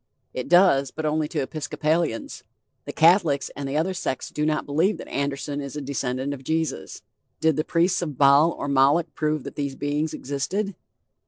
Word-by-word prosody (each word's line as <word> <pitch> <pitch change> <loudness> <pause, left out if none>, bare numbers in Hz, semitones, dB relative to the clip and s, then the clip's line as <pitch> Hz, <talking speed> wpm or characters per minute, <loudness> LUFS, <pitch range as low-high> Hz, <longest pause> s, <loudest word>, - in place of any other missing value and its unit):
It 130 +1 -5
does, 175 -6 +5
but 155 +3 -5
only 155 0 0
to 150 -2 -2
Episcopalians. 155 -1 -2 0.4
The - - -5
Catholics 160 -5 +3
and 140 -1 -4
the 140 - -1
other 175 +5 0
sects 155 -7 -3
do 150 0 -1
not 155 -1 0
believe 165 +7 +1
that - - -9
Anderson 140 +1 -3
is 140 0 -7
a - - -3
descendant 135 0 -2
of 135 -1 -9
Jesus. 160 +3 -3 0.4
Did 160 -2 +2
the 155 - 0
priests 175 +3 +1
of 150 -6 -4
Baal 140 +3 +6
or - - -5
Moloch 140 +4 +3
prove 155 -2 -1
that - - -7
these 140 -2 -3
beings 145 +2 -2
existed? 185 +9 -3
150 Hz, 180 wpm, -24 LUFS, 140-160 Hz, 0.4 s, Baal